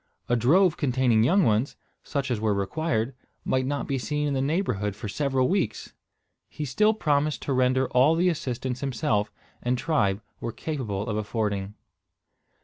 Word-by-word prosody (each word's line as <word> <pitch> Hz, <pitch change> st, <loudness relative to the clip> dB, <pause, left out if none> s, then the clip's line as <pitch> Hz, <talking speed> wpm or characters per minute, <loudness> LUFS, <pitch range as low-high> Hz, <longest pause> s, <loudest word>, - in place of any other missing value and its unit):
A 120 Hz, -, +2 dB
drove 160 Hz, -, +4 dB
containing 125 Hz, -5 st, +2 dB
young 185 Hz, -, +4 dB
ones, 115 Hz, +1 st, +1 dB, 0.3 s
such 140 Hz, -3 st, -3 dB
as 115 Hz, -, 0 dB
were 105 Hz, -1 st, +1 dB
required, 115 Hz, -, -1 dB, 0.3 s
might 130 Hz, 0 st, +1 dB
not 145 Hz, +1 st, -2 dB
be 135 Hz, -2 st, -1 dB
seen 150 Hz, +5 st, -1 dB
in 145 Hz, -, -1 dB
the 135 Hz, -, 0 dB
neighbourhood 135 Hz, -, -1 dB
for 105 Hz, -, -6 dB
several 135 Hz, +3 st, 0 dB
weeks. 180 Hz, -, -1 dB, 0.6 s
He 150 Hz, -, -5 dB
still 210 Hz, -, +2 dB
promised 150 Hz, -5 st, 0 dB
to 140 Hz, -, -1 dB
render 130 Hz, 0 st, +2 dB
all 135 Hz, +6 st, +4 dB
the 175 Hz, +2 st, +2 dB
assistance 130 Hz, -5 st, -3 dB
himself 110 Hz, -6 st, 0 dB, 0.3 s
and 125 Hz, +1 st, 0 dB
tribe 115 Hz, -10 st, +1 dB, 0.2 s
were 115 Hz, -, -4 dB
capable 110 Hz, -9 st, -4 dB
of 105 Hz, -2 st, -1 dB
affording. 105 Hz, -2 st, -2 dB
130 Hz, 160 wpm, -26 LUFS, 110-150 Hz, 0.6 s, drove